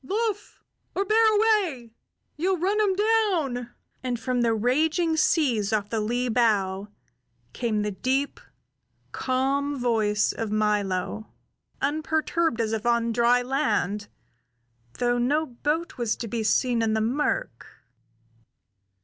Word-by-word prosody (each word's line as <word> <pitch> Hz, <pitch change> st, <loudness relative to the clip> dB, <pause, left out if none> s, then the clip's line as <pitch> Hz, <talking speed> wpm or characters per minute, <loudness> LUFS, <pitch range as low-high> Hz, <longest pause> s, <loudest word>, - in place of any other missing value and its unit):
"Luff, 420 Hz, -, -3 dB, 0.3 s
or 395 Hz, -, 0 dB
bear 445 Hz, +2 st, +4 dB
away; 380 Hz, -, +1 dB, 0.4 s
ye'll 370 Hz, +4 st, 0 dB
run 390 Hz, +5 st, 0 dB
him 405 Hz, -3 st, +2 dB
down!" 375 Hz, -, +1 dB, 0.3 s
And 245 Hz, -2 st, -2 dB
from 245 Hz, +2 st, -1 dB
the 235 Hz, -1 st, +2 dB
raging 310 Hz, -, +1 dB
seas 250 Hz, -, +2 dB
off 210 Hz, -2 st, 0 dB
the 225 Hz, -, 0 dB
lee 240 Hz, +4 st, -1 dB
bow 205 Hz, -5 st, +1 dB, 0.7 s
came 220 Hz, -4 st, -1 dB
the 210 Hz, -, -2 dB
deep, 265 Hz, +7 st, -1 dB, 0.7 s
calm 275 Hz, +2 st, -1 dB
voice 220 Hz, -4 st, +1 dB
of 225 Hz, -2 st, -4 dB
Milo, 210 Hz, -1 st, -1 dB, 0.6 s
unperturbed 315 Hz, -1 st, 0 dB
as 225 Hz, -1 st, 0 dB
if 220 Hz, -1 st, -2 dB
on 235 Hz, -1 st, +1 dB
dry 240 Hz, +2 st, +3 dB
land, 210 Hz, -7 st, -1 dB, 0.9 s
though 245 Hz, 0 st, +1 dB
no 295 Hz, +6 st, +1 dB
boat 300 Hz, +5 st, -3 dB
was 235 Hz, -2 st, 0 dB
to 235 Hz, -, -6 dB
be 230 Hz, +1 st, -3 dB
seen 235 Hz, +2 st, +2 dB
in 220 Hz, -1 st, +1 dB
the 220 Hz, -, +1 dB
murk. 295 Hz, -, -1 dB
245 Hz, 125 wpm, -25 LUFS, 225-315 Hz, 0.9 s, bear